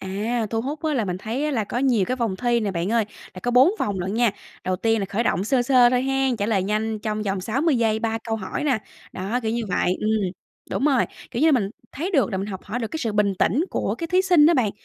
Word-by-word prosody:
À, 215 +4 -2
thu 225 -1 0
hút 290 +5 -5
á 310 - +1
là 235 -5 +1
mình 180 -2 -3
thấy 230 +8 -3
á 300 - 0
là 230 -7 0
có 240 - -3
nhiều 250 -6 +2
cái 255 - -1
vòng 225 -6 -1
thi 240 0 +1
nè, 210 - -1
bạn 180 +3 -2
ơi, 230 -2 +3 0.3
là 185 - -8
có 245 - 0
4 255 +7 +6
vòng 200 -2 -1
lận 190 +3 -3
nha. 235 -1 +3 0.3
Đầu 185 0 0
tiên 225 +3 +1
là 195 - -2
khởi 205 +4 -1
động 185 -1 +1
sơ 250 +2 +2
sơ 245 -1 +5
thôi 250 0 +2
hen, 270 -2 +1
trả 205 - -1
lời 200 -4 +1
nhanh 215 +2 -1
trong 215 0 -3
vòng 195 -2 -2
60 270 - +1
giây, 220 -2 +2
3 225 0 -1
câu 225 -1 -1
hỏi 200 +7 -4
nà. 265 -6 +2 0.3
Đó, 205 +7 -2
kiểu 220 -1 -1
như 235 0 -1
vậy. 180 0 +1
Ừm, 215 -3 +1 0.4
đúng 270 - -1
rồi, 275 -5 +3 0.3
kiểu 240 - -2
như 320 0 +5
mình 210 -7 +1 0.2
thấy 335 +8 -3
được 275 -9 +2
là 190 - -2
mình 195 - -3
học 190 -3 -6
hỏi 215 +4 -4
được 225 -3 -3
cái 320 - -5
sự 225 -6 -2
bình 205 -2 +2
tĩnh 270 - +2
của - - -1
cái 335 - -4
thí 365 +3 +2
sinh 350 -6 +5
đó 340 - +5
bạn. 240 -7 +2
225 Hz, 285 wpm, -23 LUFS, 205-260 Hz, 0.4 s, 4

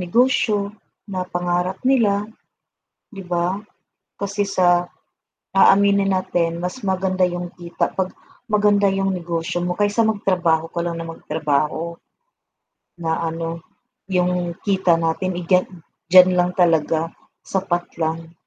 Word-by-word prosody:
negosyo 210 0 +1 0.3
na 185 -3 -4
pangarap 175 +1 -1
nila, 220 -6 +3 0.9
'di 195 -4 -10
ba? 175 +2 0 0.6
Kasi 200 0 -2
sa 175 -2 +3 0.7
aaminin 200 0 +5
natin 170 -3 0
mas 180 +8 -5
maganda 190 -1 0
yung 175 0 0
kita 175 -1 -3
pag 190 -1 -1 0.4
maganda 205 -1 +3
yung 195 0 0
negosyo 170 0 -3
mo 180 0 -2
kaysa 205 +2 +2
magtrabaho 180 -6 +1
ko 170 - -6
lang 170 -1 -3
na 165 - -5
magtrabaho. 155 +1 -2 1.0
Na 160 -1 -1
ano, 165 0 -4 0.5
yung 180 -2 0
kita 190 -4 +3
natin, 170 +2 -1
eh, 175 - -4
dya 180 +1 +4 0.5
diyan 185 0 +9
lang 180 0 +2
talaga, 165 -2 +2 0.3
sapat 180 -2 -2
lang. 165 +1 -2
180 Hz, 120 wpm, -21 LUFS, 170-195 Hz, 1.0 s, diyan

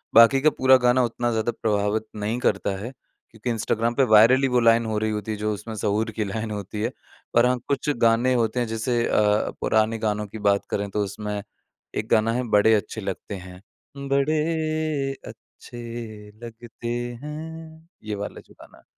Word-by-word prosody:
बाकी 115 +4 +7
का 155 - +5
पूरा 130 0 +6
गाना 125 0 +3
उतना 120 0 -1
ज़्यादा 110 +1 0
प्रभावित 105 0 0
नहीं 105 +3 -2
करता 95 -6 0
है, 115 +6 -6 0.4
क्योंकि 115 +2 -5
इंस्टाग्राम 115 +1 0
पे 135 - +4
वायरल 115 +5 +7
ही 135 - +3
वो 125 -1 +2
लाइन 115 0 +4
हो 110 -1 -2
रही 110 0 0
होती 105 +1 -3
है, 105 - -3
जो 105 +1 -1
उसमें 110 +2 -7
सहूर 110 +1 -1
की 110 0 -2
लाइन 110 +2 -4
होती 105 0 -5
है। 115 +3 -1 0.4
और 120 +1 +6
हाँ, 125 0 +2
कुछ 140 +1 -1
गाने 115 +3 +4
होते 115 -1 +1
हैं 120 - 0
जैसे 115 +2 -1
अ, 105 0 +2
पुराने 110 +1 +2
गानों 105 0 -2
की 110 - -9
बात 100 0 +1
करें 100 0 -2
तो 105 +1 -1
उसमें 105 +1 -4 0.5
एक 110 - -2
गाना 110 0 +3
है, 125 +1 -1
बड़े 105 +1 +5
अच्छे 110 +1 -3
लगते 100 +1 -5
हैं। 90 0 -10 0.5
बड़े 155 0 0
अच्छे 120 - -13 0.7
लगते 115 0 -9 0.4
हैं, 160 +1 -8 0.2
ये 105 -1 -4
वाला 100 0 -6
जो - - -21
गाना - - -15
है। - - -22
115 Hz, 185 wpm, -24 LUFS, 105-125 Hz, 0.7 s, बाकी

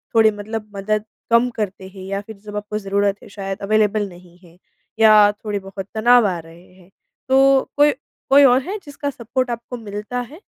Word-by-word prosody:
थोड़ी 220 -1 +6
मतलब 210 +1 -6
मदद 215 +2 -1 0.3
कम 235 +2 +4
करते 190 -2 -4
हैं 190 -1 -11
या 195 +1 -3
फिर 215 0 -12
जब 210 - -8
आपको 210 +1 -4
ज़रूरत 200 0 -1
है - - -13
शायद 195 -1 -6
अवेलेबल 210 0 +1
नहीं 175 0 -16
है। 175 -2 -20 0.4
या 215 -2 +7
थोड़े-बहुत 200 -2 -6
तनाव 240 +1 +5
आ 180 -3 -2
रहे 165 +3 -16
हैं। 185 -1 -21 0.4
तो 270 0 +5 0.2
कोई 295 +1 +6 0.4
कोई 280 +1 +7
और 255 0 +5
है 380 +9 -5
जिसका 285 0 -5
सपोर्ट 255 0 -3
आपको 235 +1 -6
मिलता 210 +2 -5
है? 290 - -11
210 Hz, 180 wpm, -20 LUFS, 195-240 Hz, 0.4 s, या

